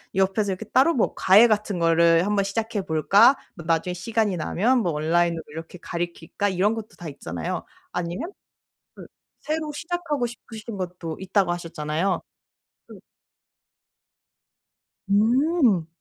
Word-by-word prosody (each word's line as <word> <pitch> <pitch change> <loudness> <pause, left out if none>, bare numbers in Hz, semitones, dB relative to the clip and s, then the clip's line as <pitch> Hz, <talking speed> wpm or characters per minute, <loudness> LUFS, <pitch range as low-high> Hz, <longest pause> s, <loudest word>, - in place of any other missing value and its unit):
옆에서 195 +1 +1
이렇게 190 +4 -5
따로 270 +9 +3
뭐 235 - +1
'과외 205 +5 +6
같은 210 -3 0
거를 165 +1 +4
한번 205 -1 +1
시작해 220 +1 -2
볼까? 200 - +5 0.2
뭐 170 -4 -10
나중에 165 +2 0
시간이 210 0 -1
나면 230 +11 +1
뭐 175 -6 0
온라인으로 165 +2 +1
이렇게 160 +3 -9
가르칠까?' 175 +3 -3
이런 195 +3 +1
것도 225 -1 -7
다 175 - -8
있잖아요. 85 - -5 0.3
아니에요? 175 +1 -3 0.8
그 - - -11 0.3
새로 310 0 -3
시작하고 315 -5 -2
싶으신 225 -2 -9
것도 180 -3 -5
있다고 190 -1 +1
하셨잖아요. 165 +1 -2 0.7
음. - - -12 2.1
음. 230 - +3
195 Hz, 295 characters per minute, -24 LUFS, 170-225 Hz, 2.1 s, 과외